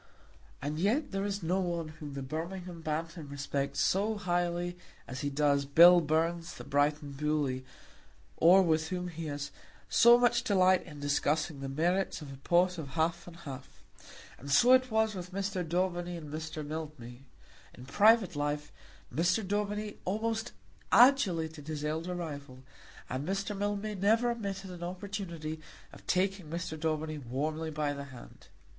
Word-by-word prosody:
And 150 +2 -2
yet 225 - +1
there 195 0 -1
is 200 -2 -3
no 180 +4 +1
one 170 -3 -2
whom 150 -2 -9
the 135 - -4
Birmingham 170 +4 -5
Bantam 160 0 -4
respects 140 0 -2
so 210 +3 +1
highly 175 -2 -1 0.3
as 130 +1 -6
he 145 - -1
does 140 0 +2
Bill 170 +5 +8
Burns 165 +2 0
the - - -9
Brighton 145 +1 0
Bully, 140 -2 -1 0.7
or 185 +4 +7
with 160 -2 +1
whom 180 +1 -3
he 165 -1 -6
has 145 -1 -4 0.4
so 235 +1 +7
much 240 0 +3
delight 185 -5 +4
in 150 -3 -10
discussing 145 +1 0
the 135 0 -4
merits 175 +7 0
of 145 -3 -9
a - - -10
pot 175 +5 +2
of 150 - -5
half 170 +2 0
and 175 - -10
half. 140 -6 -10 0.6
And 140 - -9
so 240 - +6
it 255 0 +4
was 220 -1 +2
with 180 -1 -7
Mr. 195 -1 -2
Daubeny 175 +1 -1
and 150 -3 -9
Mr. 155 -1 -5
Mildmay. 145 -6 -7 0.5
In 125 - -11
private 205 - +4
life 145 0 -2 0.4
Mr. 180 - +1
Daubeny 210 +1 -2
almost 220 +4 -2 0.4
adulated 170 - +4
his 150 -1 -4
elder 160 +4 -2
rival, 145 -6 -7 0.4
and 130 +4 -4
Mr. 195 +2 -2
Mildmay 205 +1 -2
never 220 +5 +2
omitted 195 -4 -5
an 175 -1 -9
opportunity 175 -4 -5 0.3
of - - -15
taking 190 -2 0
Mr. 170 0 -4
Daubeny 155 -1 -2
warmly 150 +5 -3
by 150 -1 -1
the 140 0 -6
hand. 130 -3 -13
170 Hz, 155 wpm, -31 LUFS, 150-195 Hz, 0.7 s, Bill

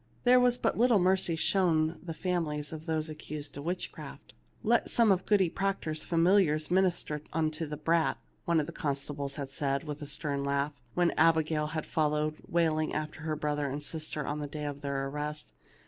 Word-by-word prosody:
There 250 0 +6
was 245 -1 +4
but - - 0
little 240 -2 +5
mercy 185 -2 +2
shown 160 -2 +2
the 165 -2 -5
families 160 -5 -2
of 160 +1 -8
those 160 -1 0
accused 150 -2 -7
of 140 - -6
witchcraft. 180 +2 -5 0.2
" - - -34
Let - - +3
some 230 -3 +4
of 190 -1 +1
Goody 200 -4 +4
Proctor's 165 -4 -2
familiars 165 -3 +3
min 190 +1 +5
ister 155 -4 -1
unto 160 0 -1
the 150 0 -5
brat," 165 +2 +2 0.3
one 170 -1 +3
of 150 - 0
the 170 - -7
constables 140 -2 -3
had 140 -2 -5
said, 140 +1 -1
with 150 -1 -6
a 145 - -5
stern 140 -1 -1
laugh, 140 +1 0 0.2
when 175 -1 +3
Abigail 160 -1 +3
had 155 0 -3
fol 155 -3 +1
lowed 150 +1 -1
wailing 160 -2 +1
after 155 +1 -4
her 155 -1 -2
brother 150 -1 -1
and 145 +2 -4
sister 155 -1 -4
on 150 +1 -2
the 145 - -3
day 150 +1 -5
of 145 -1 -5
their 140 -1 -2
arrest. 150 +2 -5
155 Hz, 195 wpm, -30 LUFS, 150-170 Hz, 0.3 s, There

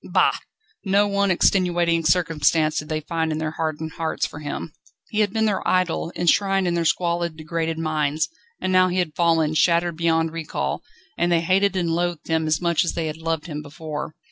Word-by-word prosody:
Bah!!! - - +3 0.5
Not 200 +1 +2
one 200 0 +2
extenuating 175 -2 +2
circumstance 155 -2 +2
did 150 - -8
they 155 0 -1
find 160 +1 -2
in 155 - -1
their 155 -1 -2
hardened 160 0 -3
hearts 165 -1 -1
for 145 - -7
him. 150 +1 -5 0.4
He 215 - -2
had 205 -2 +2
been 220 +1 +1
their 205 -3 0
idol, 180 -2 +1
enshrined 195 +2 +2
in 175 - +1
their 170 -1 0
squalid, 170 0 0
degraded 160 +1 -3
minds, 155 -1 0 0.3
and 185 - -1
now 185 0 +5
he 180 0 -2
had 175 -4 0
fallen, 165 -2 +2
shattered 170 +1 +2
beyond 165 -1 +1
recall, 155 - -3 0.4
and 175 0 +2
they 170 -1 +3
hated 190 +3 +2
and 175 -3 0
loathed 175 0 -1
him 160 -1 +1
as 155 0 +2
much 170 -2 +2
as 170 - -2
they 165 - -2
had 155 0 -4
loved 165 -1 -2
him 150 -3 -5
before. 150 +1 -6
165 Hz, 195 wpm, -23 LUFS, 155-175 Hz, 0.5 s, now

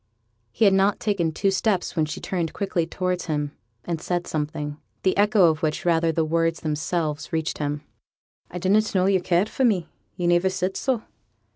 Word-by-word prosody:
He 220 - +2
had 195 - +6
not 195 +1 +3
taken 190 -6 0
two 195 +5 +1
steps 195 -2 0
when 155 -2 +1
she - - -5
turned 170 -4 -2
quickly 180 -4 -1
towards 180 +1 -2
him, 150 -2 -1 0.3
and 165 -2 -3
said 175 -1 -1
something 150 -1 -3 0.3
the 185 - +2
echo 205 -2 +5
of 155 - -5
which, 155 +1 -1
rather 165 -1 +3
than 160 - 0
the 160 - +2
words 165 +1 0
themselves, 155 0 -2
reached 160 -1 -2
him. 145 0 -2 0.7
'I 180 - -6
didn't 205 +4 +2
know 185 -1 +3
yo' 195 -1 +3
cared 180 +3 +2
for 265 - -2
me; 200 -9 +2 0.3
yo' 175 - -2
niver 175 +2 +3
said 185 0 -2
so.' 255 -4 -1
175 Hz, 190 wpm, -24 LUFS, 160-190 Hz, 0.7 s, had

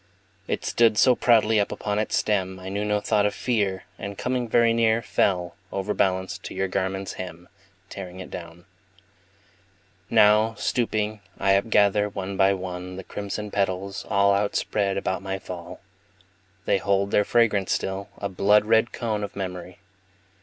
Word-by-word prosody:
It - - -2
stood 115 -3 +3
so 125 - +6
proudly 110 -3 +4
up 100 - 0
upon 105 0 -2
its 110 - 0
stem, 95 -3 0
I 95 0 -7
knew 100 +2 -2
no 105 0 +1
thought 105 -1 +2
of 105 - -4
fear, 100 -6 -1 0.2
And 100 0 -6
coming 125 -1 -1
very 115 0 +4
near 115 0 +2
Fell, 90 -4 0 0.2
overbalanced, 95 -1 -1
to - - -7
your 95 - 0
garment's 95 +1 -2
hem, 90 -1 -9 0.4
Tearing 95 -2 -8
it 95 - -9
down. 85 0 -9 1.4
Now, 110 +2 +5
stooping, 110 -2 -1 0.2
I 95 - +2
upgather, 105 0 +3
one 95 0 -5
by 95 +1 +4
one, 90 -1 -6
The 95 - -7
crimson 105 +1 -5
petals, 100 0 -2
all 100 0 +4
Outspread 100 0 0
about 95 -1 -2
my 95 0 -3
fall. 90 -2 -9 0.8
They 100 - +2
hold 100 +1 +1
their 105 - +4
fragrance 105 -4 +2
still, 95 +1 -2
a 100 - -3
blood 105 +2 +3
red 110 +1 +3
cone 110 -3 -2
Of 100 - -6
memory. 90 -1 -6
100 Hz, 155 wpm, -25 LUFS, 95-105 Hz, 1.4 s, so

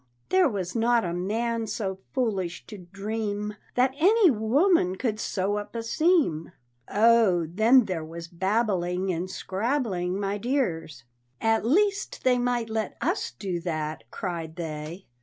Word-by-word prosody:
There 370 -4 +4
was 190 -4 -4
not 235 -1 +3
a 170 - -2
man 225 +5 -1
so 200 -3 -3
foolish 195 -9 -2
to 210 -3 -10
dream 205 +3 -4 0.2
That 255 +1 +3
any 395 +1 +5
woman 235 - +2
could 215 0 -2
sew 200 -1 -1
up 205 +2 -6
a 230 - -3
seam!" 275 - +1 0.4
Oh, 215 -5 +4
then 220 +9 +4
there 180 -5 -3
was 165 +1 -8
babbling 190 -1 0
and 175 +2 -3
scrabbling, 190 -3 -2
my 200 0 -2
dears! 170 - -2 0.4
"At 225 0 +1
least 400 - +1
they 250 -1 +3
might 245 -2 0
let 220 -1 -2
us 370 +6 -1
do 185 -4 -4
that!" 155 -6 -4
cried 165 - -5
they. 160 +2 -6
205 Hz, 140 wpm, -26 LUFS, 180-240 Hz, 0.4 s, any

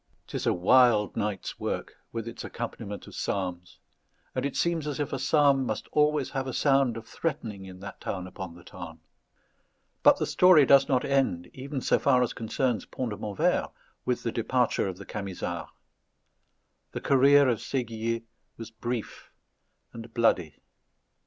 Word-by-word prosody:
'Tis - - -4
a - - +4
wild 105 +3 +4
night's 105 -2 -3
work, - - -3 0.2
with 115 0 -4
its 115 - -7
accompaniment 110 -3 -6
of - - -13
psalms; 90 -2 -3 0.6
and - - 0
it 140 - -8
seems 170 -3 0
as 145 -1 -3
if 145 - -2
a 135 - -1
psalm 140 0 +4
must 110 -3 -3
always 150 -2 +2
have 135 0 -2
a 130 - -4
sound 135 -5 +3
of 115 - -8
threatening 115 -13 -4
in 95 0 -11
that 100 0 -9
town 90 -2 -4
upon 95 -2 -8
the 85 - -14
Tarn. 90 -3 -10 1.0
But - - +6
the - - 0
story 180 -6 +6
does 140 +2 +6
not 130 -2 +2
end, 130 -11 0
even 135 +1 -5
so - - +2
far 125 -3 +4
as 120 - -2
concerns 115 -1 -1
Pont 125 -3 -4
de 105 - -5
Montvert, 105 -3 0 0.3
with 125 - -1
the 115 - -1
departure 120 -1 +1
of 95 -2 -5
the - - -10
Camisards. 100 -3 -5 1.2
The - - -4
career 140 +1 +5
of 120 -4 +1
Séguier 115 -3 -2 0.3
was 115 -1 -8
brief 120 0 -5 0.6
and 115 0 -9
bloody. 90 - +2
115 Hz, 165 wpm, -28 LUFS, 100-135 Hz, 1.2 s, But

